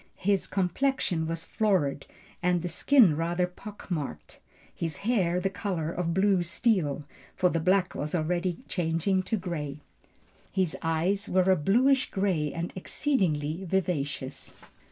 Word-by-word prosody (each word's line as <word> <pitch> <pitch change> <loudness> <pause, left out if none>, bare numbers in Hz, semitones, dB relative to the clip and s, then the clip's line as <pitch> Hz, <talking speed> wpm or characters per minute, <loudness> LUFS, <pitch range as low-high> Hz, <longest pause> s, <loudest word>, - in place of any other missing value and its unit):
His 195 0 +1
complexion 185 -3 0
was 165 0 -3
florid, 185 -11 0 0.3
the 175 -1 +1
skin 195 - +5
rather 170 +3 0
pock 195 +2 -11
marked, 140 - -4 0.3
his 165 -3 -3
hair 185 -7 +2
the 185 - 0
color 180 -5 -2
of 170 -1 -2
blue 190 +1 +3
steel, 175 - 0 0.3
for 180 - +3
the 165 - 0
black 185 +2 +2
was 150 +4 -3
already 175 +2 -1
changing 175 +2 0
to 200 +4 -1
grey. 150 -6 -4 0.7
His 185 -4 0
eyes 175 +6 0
were 185 +1 +3
a - - +6
bluish 250 - +3
grey 185 -7 0
and 170 +1 -4
exceedingly 180 - 0
vivacious. 160 -7 -2
180 Hz, 135 wpm, -28 LUFS, 160-195 Hz, 0.7 s, a